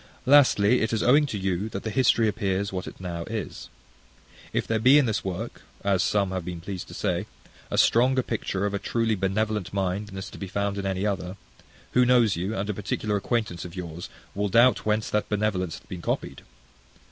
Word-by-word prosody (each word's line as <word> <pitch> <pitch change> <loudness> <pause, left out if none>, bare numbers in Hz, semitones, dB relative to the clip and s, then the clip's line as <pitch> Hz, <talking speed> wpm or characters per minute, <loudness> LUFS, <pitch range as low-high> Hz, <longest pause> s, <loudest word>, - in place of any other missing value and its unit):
Lastly, 125 -5 +5
It 110 +1 0
is 110 - +1
owing 145 +4 +5
to 110 - -3
you 95 +2 -1
that 100 -2 -5
the 110 - -3
history 120 -1 +3
appears 100 -1 -1
what 90 -1 -4
it - - -10
now 85 -2 -4
is. - - -5 0.8
If - - -1
there 110 -1 0
be 130 +6 +6
in 145 - +5
this 110 -3 -1
work, 95 +5 -5 0.2
as 100 -2 +2
some 100 0 +1
have 95 -1 -3
been 85 0 -5
pleased 90 +1 -6
to - - -10
say, - - -1 0.4
a - - -2
stronger 130 +2 +4
picture 100 -4 -2
of 100 - -1
a 100 - -1
truly 115 +1 0
benevolent 105 +1 -1
mind 95 +2 -1
than 95 -2 -9
is 95 +1 -6
to - - -11
be 100 - -5
found 100 +1 -2
in 100 - -2
any 95 +1 -1
other, 95 -2 -2 0.5
who - - +2
that 125 - +5
knows 120 -5 +4
you, 95 +6 -2
and 95 +1 -2
a 105 - -1
particular 105 +1 -2
acquaintance 105 -4 -1
of 90 0 -9
yours, 85 -2 -6 0.2
will 100 +1 -1
doubt 120 +3 +4
whence 105 0 +1
that 105 - 0
benevolence 100 -5 -1
hath - - -18
been 90 -2 -7
copied? - - -3
100 Hz, 215 wpm, -26 LUFS, 95-110 Hz, 0.8 s, be